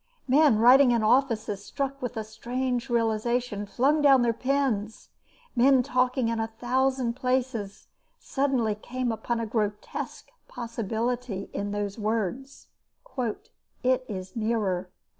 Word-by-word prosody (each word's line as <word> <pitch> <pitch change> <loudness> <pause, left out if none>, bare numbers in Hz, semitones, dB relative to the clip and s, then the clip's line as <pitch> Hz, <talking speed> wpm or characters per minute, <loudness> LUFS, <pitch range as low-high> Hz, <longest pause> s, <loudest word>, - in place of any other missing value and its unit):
Men 280 -3 +5
writing 250 +4 +7
in 235 -2 +2
offices, 220 -4 +1
struck 275 +3 -4
with 245 -2 -4
a 220 - -2
strange 245 +3 -3
realisation, 230 -1 0
flung 275 +9 +2
down 270 -3 +6
their 235 -1 +2
pens, 245 -4 -1 0.5
men 260 +1 +5
talking 255 -1 +1
in 230 0 -1
a 225 - 0
thousand 250 +2 0
places 250 -5 -2 0.3
suddenly 265 -6 0
came 245 +3 -3
upon 230 +2 -2
a 230 - -2
grotesque 210 -2 -4 0.2
possibility 230 -1 -3
in 200 +1 -3
those 205 +1 -3
words, 225 +5 -3 1.2
"It 255 0 +2
is 185 0 -6
nearer." 210 -5 -1
235 Hz, 120 wpm, -27 LUFS, 215-260 Hz, 1.2 s, writing